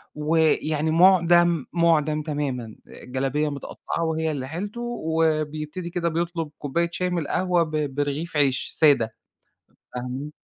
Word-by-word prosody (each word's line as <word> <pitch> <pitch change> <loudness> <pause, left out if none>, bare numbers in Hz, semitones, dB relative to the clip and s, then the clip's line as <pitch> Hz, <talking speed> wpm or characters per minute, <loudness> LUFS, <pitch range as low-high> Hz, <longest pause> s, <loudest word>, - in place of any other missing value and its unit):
ويعني 155 0 +1
مُعدَم، 175 -2 +5
مُعدَم 155 -3 +2
تمامًا 135 -7 -3
آآ، - - -13
جلابية 135 +4 -1
مِتقطّعة 145 +3 -5
وهي 160 0 -1
اللي 130 -3 -4
حيلته، 200 - -5
وبيبتدي 160 -5 -1
كده 175 -1 -1
بيطلب 165 -1 -2
كوباية 170 +4 -1
شاي 180 +1 -1
من 175 -1 -1
القهوة 175 +3 +1
ب 155 -4 -3
برغيف 145 +3 -2
عيش 135 -3 +2
سادة، 140 -8 +3 0.8
فاهمة؟ 125 +4 -5
155 Hz, 125 wpm, -24 LUFS, 145-170 Hz, 0.8 s, مُعدَم